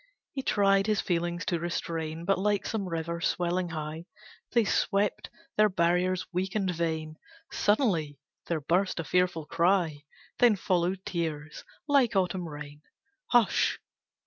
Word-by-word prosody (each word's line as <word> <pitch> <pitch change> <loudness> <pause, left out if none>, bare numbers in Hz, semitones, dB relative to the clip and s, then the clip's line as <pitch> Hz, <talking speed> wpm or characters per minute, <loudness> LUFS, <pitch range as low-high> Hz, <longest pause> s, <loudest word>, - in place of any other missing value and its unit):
He 270 - -3
tried 195 -4 +3
his 215 -1 +2
feelings 175 0 -1
to 175 -5 0
restrain, 165 -1 -3
But 195 0 +2
like 205 0 +1
some 200 -4 -2
river 170 0 -3
swelling 175 +1 0
high 160 +1 -5 0.4
They 235 -2 +3
swept 200 0 0 0.3
their 215 0 +5
barriers 180 0 +1
weak 185 +3 -2
and 190 -4 0
vain, 160 -2 -2 0.3
Sudden 190 - +1 0.3
there 165 -3 -1
burst 180 +6 +1
a - - -1
fearful 180 -2 +1
cry, 170 -3 +1 0.3
Then 240 -3 +6
followed 185 0 0
tears, 155 -3 -4 0.2
like 275 -7 +3
autumn 180 -2 0
rain. 145 0 -9 0.5
Hush! 240 -4 +3
175 Hz, 135 wpm, -28 LUFS, 165-195 Hz, 0.5 s, Then